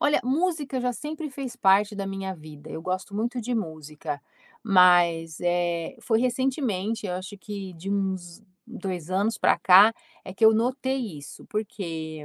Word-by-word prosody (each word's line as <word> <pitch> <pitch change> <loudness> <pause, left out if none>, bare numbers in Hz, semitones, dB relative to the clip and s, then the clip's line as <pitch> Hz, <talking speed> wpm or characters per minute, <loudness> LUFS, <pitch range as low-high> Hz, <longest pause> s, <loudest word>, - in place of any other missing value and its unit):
Olha 295 - +3
música 290 -1 0
já 250 0 0
sempre 300 +3 -6
fez 265 -3 -6
parte 200 -1 +4
da 195 -1 -3
minha 195 -1 -4
vida, 155 -1 -12
eu 160 - -6
gosto 185 +2 -3
muito 240 +4 -1
de 245 +2 -2
música, 155 -6 -5 0.4
mas 175 -5 +4
eh 175 -1 0
foi 225 -1 +2
recentemente 240 -5 -1
eu 180 - -2
acho 185 +3 -6
que 195 -2 -7
de 185 +5 -6
uns 190 -3 -2 0.3
2 180 -3 -5
anos 205 +4 +1
pra - - +4
cá 200 +5 +7 0.3
é 185 - -8
que 225 - +2
eu 220 - +8
notei 250 - -1
isso, 140 - -11
porque 165 -8 -5
195 Hz, 160 wpm, -26 LUFS, 175-235 Hz, 0.4 s, eu